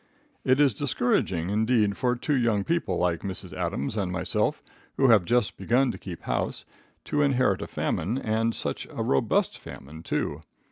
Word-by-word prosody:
It 130 +2 +3
is 140 -4 +5
discouraging, 100 - 0
indeed, 110 -1 +2
for 125 -2 +1
two 145 +5 -1
young 115 -5 +2
people 110 - 0
like 90 -2 +1
Mrs. 95 -3 -6
Adams 90 - -2
and 95 -4 -1
myself, 90 -1 -1 0.3
who 135 -1 +4
have 105 -6 +6
just 120 +1 +1
begun 125 +2 +2
to - - -8
keep 90 -4 -8
house, - - -2 0.4
to 150 - 0
inherit 130 -8 +2
a - - -4
famine, 100 +10 -1
and 115 -2 0
such - - -3
a - - -4
robust 70 - +1
famine, 75 +4 -10
too. 75 -2 -2
110 Hz, 170 wpm, -26 LUFS, 90-125 Hz, 0.4 s, have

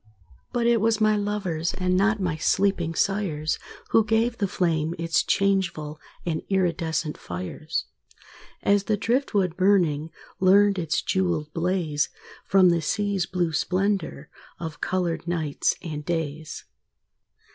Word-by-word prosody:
But 240 -1 0
it 235 -2 +3
was 225 0 +2
my 215 0 +4
lovers, 200 -5 -2
And 185 -1 0
not 215 +3 +2
my 180 -4 -1
sleeping 175 0 +1
sires, 165 -7 0 0.3
Who 225 - +5
gave 225 +2 +1
the 200 - +1
flame 165 -4 0
its 165 0 +1
changeful 175 -6 0 0.3
And 160 -2 -1
iridescent 165 -5 0
fires; 90 - -4 0.8
As 200 0 +3
the 215 - +1
driftwood 210 - 0
burning 175 -6 +2 0.3
Learned 195 +1 +5
its 165 -3 -1
jewelled 170 -5 -1
blaze 165 -4 0 0.4
From 190 -2 +6
the 170 -1 +1
sea's 200 +3 0
blue 175 -3 -1
splendor 185 -4 -1 0.3
Of 160 -3 -6
colored 175 -3 -1
nights 160 -4 0
and 150 -4 -5
days. 160 -2 -4
180 Hz, 125 wpm, -25 LUFS, 160-200 Hz, 0.8 s, From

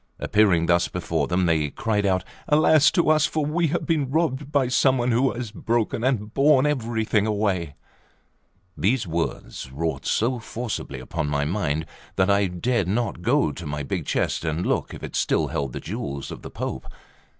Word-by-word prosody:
Appearing 100 -6 +3
thus 85 0 +3
before 80 -5 -2
them, 90 +1 +1
they 80 -3 +2
cried 105 +3 0
out: 95 -1 +1 0.2
"Alas 155 0 +5
to 170 - +1
us! 155 -1 +4
for 155 -2 -1
we 165 +3 +1
have 170 +4 -2
been 150 -6 0
robbed 145 -2 0
by 140 -3 +2
some 130 +1 +3
one, 120 0 +1
who 125 +3 +3
has 120 -3 -5
broken 115 0 -1
and 115 -5 0
borne 140 -1 +4
everything 110 -6 0
away!" 100 -8 -1 1.0
These 115 +4 +1
words 80 -6 -4
wrought 80 +4 -3
so 120 +3 +1
forcibly 110 - -5
upon 65 +3 -3
my 70 0 0
mind 80 -3 -1 0.3
that 95 +1 +3
I 100 0 +3
dared 95 +3 -1
not 110 -2 -1
go 135 +9 +2
to 85 -4 -8
my 75 0 -3
big - - -3
chest - - 0
and 80 +2 -1
look - - 0
if - - -11
it - - -6
still - - +1
held 70 -3 -2
the - - -5
jewels 70 -1 -5
of - - -8
the - - -8
Pope. - - -5
105 Hz, 185 wpm, -24 LUFS, 85-130 Hz, 1.0 s, Alas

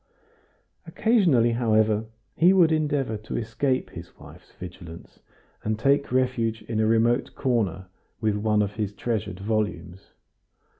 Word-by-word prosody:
Occasionally, 170 - +3
however, 110 -2 +2 0.3
he 175 +3 +5
would 175 -4 +5
endeavor 145 -7 0
to 105 - -6
escape 130 +4 -1
his - - -11
wife's - - -15
vigilance, 85 -2 -11 0.4
and 110 0 -1
take 140 +4 +1
refuge 125 -3 0
in 110 -2 -3
a 110 - +2
remote 115 +3 +1
corner 105 - -1 0.3
with 110 -2 0
one 105 0 +1
of 100 +1 -5
his 105 -2 -2
treasured 110 -5 -3
volumes. 95 -4 -3
110 Hz, 130 wpm, -25 LUFS, 105-130 Hz, 0.4 s, he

